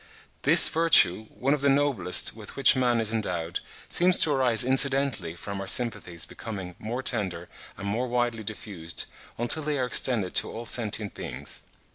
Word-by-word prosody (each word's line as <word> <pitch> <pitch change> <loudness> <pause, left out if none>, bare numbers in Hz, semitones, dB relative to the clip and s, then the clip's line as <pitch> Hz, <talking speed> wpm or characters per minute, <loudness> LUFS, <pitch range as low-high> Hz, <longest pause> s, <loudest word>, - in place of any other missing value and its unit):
This - - +7
virtue, 155 - +3
one 135 +3 -2
of 150 - -3
the 140 - +1
noblest 135 -13 0
with 110 -3 -10
which 135 0 +3
man 125 -2 0
is 110 0 +3
endowed, 90 -7 -4 0.3
seems 180 +1 +2
to 155 - +3
arise 130 -4 +3
incidentally 135 - +4
from 100 +3 -8
our 95 - -8
sympathies 95 -6 +1
becoming 95 -5 -9
more 120 +4 -6
tender 95 -9 -4 0.3
and 100 - -8
more 115 +5 -3
widely 120 -2 -3
diffused, 100 -6 -6 0.3
until 120 +7 +1
they 150 -1 -3
are 130 - -2
extended 115 -6 +1
to - - +1
all 115 +1 -9
sentient 105 -2 -2
beings. - - -8
115 Hz, 165 wpm, -25 LUFS, 100-130 Hz, 0.3 s, This